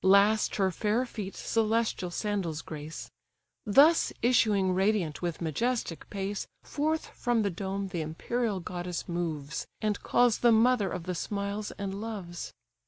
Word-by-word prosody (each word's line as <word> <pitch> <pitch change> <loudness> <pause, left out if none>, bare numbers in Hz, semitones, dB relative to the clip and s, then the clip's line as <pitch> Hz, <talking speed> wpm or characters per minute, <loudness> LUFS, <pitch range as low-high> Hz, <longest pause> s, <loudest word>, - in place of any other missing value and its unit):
Last 200 +3 +5
her 190 -2 +2
fair 215 +6 +1
feet 210 -5 -6
celestial 225 -4 0
sandals 175 -5 -2
grace. 155 0 -7 0.6
Thus 290 +10 +6
issuing 210 -6 +4
radiant 190 -5 +1
with 175 -2 -3
majestic 180 - -1
pace, 200 0 -3 0.2
Forth 310 +2 -1
from 240 -3 +1
the 200 - 0
dome 195 +2 -3
the 175 -3 -2
imperial 200 +7 -2
goddess 175 0 -4
moves, 155 -5 -3
And 210 -2 -1
calls 245 -2 +3
the 240 - +5
mother 225 -2 +4
of 175 - -4
the 180 +1 -3
smiles 200 +3 -3
and 200 0 -4
loves. 195 -6 -5
200 Hz, 140 wpm, -29 LUFS, 175-225 Hz, 0.6 s, Thus